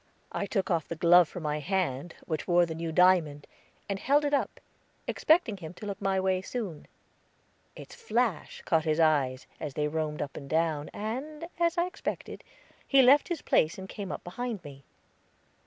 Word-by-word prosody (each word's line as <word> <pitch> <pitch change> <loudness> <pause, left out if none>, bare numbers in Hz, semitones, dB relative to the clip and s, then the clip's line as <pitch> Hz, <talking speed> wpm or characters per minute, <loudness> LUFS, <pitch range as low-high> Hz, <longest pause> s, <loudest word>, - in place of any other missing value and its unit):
I 200 - -2
took 195 -1 -1
off 165 -3 0
the 170 - -4
glove 175 +1 +6
from 180 - -7
my 150 0 -1
hand 170 -3 -2
which 155 -3 -3
wore 175 0 +4
the 165 - -5
new 165 0 -4
diamond, 160 -5 +3 0.4
and 195 -1 -3
held 290 +6 +3
it 290 - -1
up, 285 - 0 0.5
expecting 310 - +2
him 170 -1 -9
to 210 - -9
look 200 -1 -5
my 195 -1 +1
way 190 -1 +1
soon. 190 -7 -5 0.9
Its - - -11
flash 240 - -2
caught 160 -2 +2
his 155 0 +1
eyes, 140 -5 +2
as 150 -4 -5
they 150 0 0
roamed 150 -1 -2
up 140 - -8
and 140 -2 -8
down, 155 -2 0
and, 280 +10 -5
as 340 0 +2
I 345 - +3
expected, 365 +2 -5 0.4
he 270 -1 +6
left 275 +4 +6
his 345 -4 -4
place 155 - +2
and 190 0 -7
came 200 -1 -6
up - - -6
behind 225 +2 -5
me. 140 -2 -11
180 Hz, 185 wpm, -29 LUFS, 155-230 Hz, 0.9 s, glove